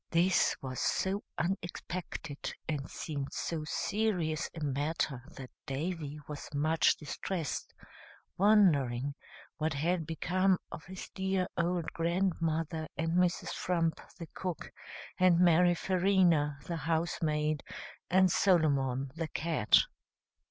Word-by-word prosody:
"] - - -59
This 175 +2 +3
was 130 -1 -4
so 195 +2 0 0.2
unexpected, 175 -3 -4
and 145 -3 -3
seemed 140 -3 -4
so 160 -2 -3
serious 180 -4 0
a - - -4
matter, 145 -1 -1
that 130 -2 -9 0.2
Davy 150 +1 -3
was 150 -1 -7
much 155 +3 +3
distressed, 155 +1 -4 0.6
wondering 145 - +4 0.4
what 155 -1 0
had 165 +2 0
become 185 +4 +2
of 170 -3 -7
his 185 +1 -8
dear 190 -1 0
old 170 0 -1
grandmother, 165 -2 0
and 165 0 0
Mrs. 180 0 +2
Frump, 165 -2 0 0.2
the 170 - -6
cook, 180 -3 -5 0.5
and 185 -2 +5
Mary 175 0 +5
Farina, 175 -6 +3
the 170 - -3
housemaid, 155 -1 0 0.5
and 185 0 +5
Solomon, 140 -9 +2
the 165 +1 -3
cat. 155 -8 +3
165 Hz, 115 wpm, -32 LUFS, 150-180 Hz, 0.6 s, and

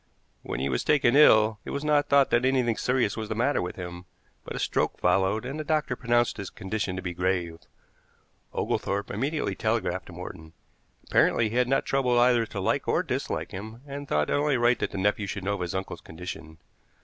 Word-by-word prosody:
When - - -5
he 65 - 0
was 65 -3 -1
taken 135 -4 +3
ill 110 -7 +6
it - - -8
was 140 - -3
not 150 -1 +2
thought 140 -1 +4
that 120 +1 +3
anything 130 -3 +2
serious 125 -5 0
was 110 -1 -5
the 110 - -2
matter 125 +6 +1
with 90 - -4
him, 90 -1 -7 0.4
but - - -7
a - - -3
stroke - - 0
followed, 95 +5 +2
and 140 +4 -5
the - - -2
doctor 150 -4 0
pronounced 120 -1 +1
his 100 - -5
condition 95 -1 -3
to 95 - -5
be 90 -2 -3
grave. 90 -2 -1 0.9
Oglethorpe 100 +1 -2
immediately 140 +9 -1
telegraphed 110 -5 -1
to 90 - -11
Morton. 85 -2 -9 0.5
Apparently 115 -2 +3
he 115 - -6
had 125 0 +3
not 135 - +1
troubled 125 -3 +1
either 120 -2 +4
to 100 - -6
like 95 - 0
or - - +2
dislike - - -3
him, 110 +5 -8
and 140 0 -7
thought 75 - 0
it - - +2
only 145 -1 +2
right 120 +1 +3
that - - -1
the - - -7
nephew 100 +1 0
should 100 -1 -5
know 100 +1 0
of 100 - -4
his 90 0 -3
uncle's 95 -2 -4
condition. 80 -1 -8
110 Hz, 210 wpm, -27 LUFS, 95-125 Hz, 0.9 s, ill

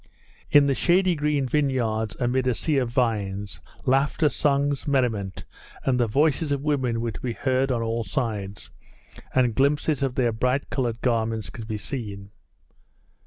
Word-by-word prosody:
In 145 -1 +6
the 140 - +2
shady 180 +5 +3
green 150 -3 0
vineyards 120 -7 0
amid 130 +1 +1
a 125 - +2
sea 150 +3 0
of 125 -3 -1
vines, 105 -5 -1 0.2
laughter, 140 +3 +2
songs, 140 0 0
merriment, 115 -9 0 0.4
and 125 -2 +1
the 120 - +2
voices 145 +5 +1
of 140 -1 -1
women 130 -6 0
were 115 -1 -2
to - - -8
be 120 -2 -2
heard 130 +2 0
on 115 -2 0
all 115 +1 -1
sides, 105 -2 -4 0.6
and 125 -3 +3
glimpses 140 +2 +1
of 135 -2 -1
their 120 -3 +2
bright 125 +5 -1
coloured 120 -4 -1
garments 115 -3 0
could 110 -2 -8
be 110 -2 -3
seen. 105 -4 -6
125 Hz, 160 wpm, -25 LUFS, 115-140 Hz, 0.6 s, In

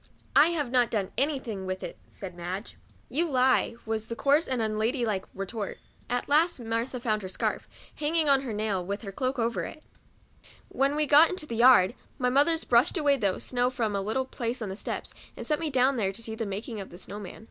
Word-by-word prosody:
" - - -35
I 310 - +8
have 300 -7 -1
not 245 -2 +3
clone 200 -4 -1
any 285 +1 +1
thing 210 -7 -6
with 185 0 -4
it," - - -6
said 190 -3 -8
Madge. 180 +4 -6 0.2
" - - -32
You 340 +1 +2
lie," 255 -3 +3
was 220 0 -3
the 230 - -4
coarse 285 +6 +3
and 255 -2 -1
unladylike 220 -1 0
retort. 195 +2 -4 0.3
At 245 0 -1
last 310 +2 +3
Martha 230 +2 -2
found 215 -3 0
her 190 - -6
scarf, - - -2 0.3
hanging 310 +1 +1
on 275 -1 +5
her 260 -4 -5
nail, 210 -3 -1
with 200 +5 -4
her 200 - -6
cloak 255 +6 -2
over 230 0 0
it. 310 - -8 0.9
When 275 +1 +1
we 305 0 +2
got 300 +3 +7
into 370 -4 -4
the 235 - -5
yard, 240 -4 +6 0.2
my 250 -1 +1
mothers 315 +5 +3
brushed 245 +10 +3
away 295 -3 +3
the 230 -7 +1
COUNTRY - - +3
DOLL. 185 - -2
51 - - -4
snow 245 0 +2
from 230 -5 -1
off - - +1
a - - -3
little 260 +6 -1
place 240 -1 -3
on 205 - -4
the 190 - -5
steps, - - -4 0.2
and - - -5
set 300 -1 0
me 325 -2 -2
down 260 0 +3
there 195 -4 +1
to 195 - -9
see 225 - -5
the 220 -1 -3
making 210 +2 -5
of 190 - -9
the 175 - -11
snow 200 +2 -7
man. 195 -3 -9
235 Hz, 245 wpm, -28 LUFS, 210-275 Hz, 0.9 s, I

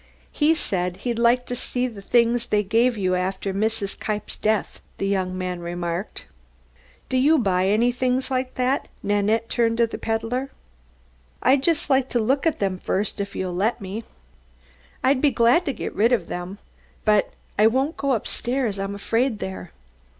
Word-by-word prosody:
"He 310 +2 +3
said 180 - -1
he'd 235 -2 -1
like 240 +1 +3
to 245 - -3
see 250 0 -1
the 225 -5 -6
things 235 +2 +2
they 210 0 +2
gave 230 +4 +2
you 185 -2 +1
after 190 +2 -1
Mrs. 205 0 -1
Kniepp's 210 -1 -3
death," 215 -1 -1 0.2
the - - -2
young 185 -2 -1
man 180 -1 -3
remarked, 175 +2 -4 0.8
"Do 260 - 0
you 295 +5 +5
buy 190 -6 +2 0.2
things 255 +1 0
like 255 0 -1
that?" 255 +2 0 0.2
Nanette 205 +3 +1
turned 230 -1 +1
to 235 - +4
the 230 - -7
peddler. 225 +4 -2 0.9
"I'd 260 +1 +4
just 315 -1 +2
like 265 -1 +3
to 240 - +1
look 270 +7 +1
at 320 - +1
them 190 -2 -1
first, 200 +2 -1
if 200 0 -5
you'll 185 -1 -2
let 210 +8 0
me." 200 +3 -5 1.0
"I'd 260 0 +3
be 295 - +5
glad 250 +7 +3
to 280 - 0
get - - -5
rid 225 +4 +3
of 225 -9 +2
them. 180 +4 -6 0.5
But 210 -1 +3 0.3
I 215 - +7
won't 265 +7 +1
go 275 -1 0
upstairs, 240 -1 -2
I'm 195 +1 -3
afraid 230 +4 0
there." 190 -3 -6
225 Hz, 170 wpm, -23 LUFS, 195-255 Hz, 1.0 s, I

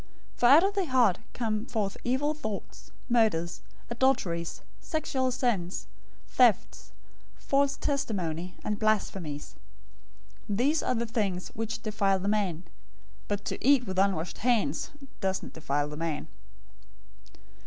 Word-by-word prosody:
015:019 - - -27
For - - +3
out 290 +7 +8
of 395 +1 +2
the 395 -2 0
heart 245 -8 +4
come 220 -2 -2
forth 205 -4 -1
evil 265 +5 +1
thoughts, 220 -10 -6 0.2
murders, 215 -9 +2 0.3
adulteries, 235 -10 0 0.2
sexual 275 -4 -1
sins, 235 -8 -1 0.4
thefts, 240 -6 +2 0.5
false 280 0 +1
testimony, 180 - -2
and 210 -1 -2
blasphemies. 190 -8 -1 0.9
015:020 200 - 0
These 290 +7 +2
are 255 - 0
the 235 0 0
things 200 -6 -2
which 225 0 -4
defile 205 -3 +2
the 190 +1 -4
man; 195 -5 0 0.6
but 205 0 -2
to - - -4
eat 270 0 +5
with 190 -2 -2
unwashed 190 -4 0
hands 215 - +1 0.3
doesn't 190 -2 -2
defile 145 -1 -1
the 150 - -7
man." 160 -2 -3
215 Hz, 130 wpm, -29 LUFS, 180-250 Hz, 0.9 s, out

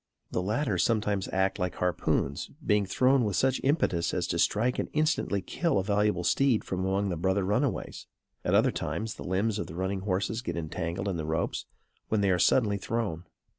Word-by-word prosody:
The - - 0
latter 105 +1 0
sometimes 105 0 +1
act 95 0 +1
like 90 -1 -1
harpoons, 85 -5 -1 0.2
being 105 -2 +2
thrown 130 +4 +3
with 105 -4 -1
such 130 -1 +2
impetus 100 - +1
as 90 - 0
to 85 - -1
strike 115 +8 +2
and - - -2
instantly 155 -10 +1
kill 165 - 0
a 95 - +1
valuable 100 -2 +1
steed 130 +5 +2
from 95 - -3
among 95 +2 0
the 90 - -1
brother 95 +4 +1
runaways. 110 +8 -1 0.4
At - - +2
other - - +4
times, 110 0 -3
the - - -9
limbs 100 +4 0
of - - -3
the 80 - -9
running 95 +2 -1
horses 100 +4 -1
get 125 - -4
entangled 85 +4 -3
in 95 -3 -1
the 80 - -3
ropes, 80 +1 -2 0.4
when 110 -2 +2
they 100 -1 +3
are 90 - +2
suddenly 105 -3 +3
thrown. 100 -6 -3
100 Hz, 195 wpm, -28 LUFS, 90-110 Hz, 0.4 s, other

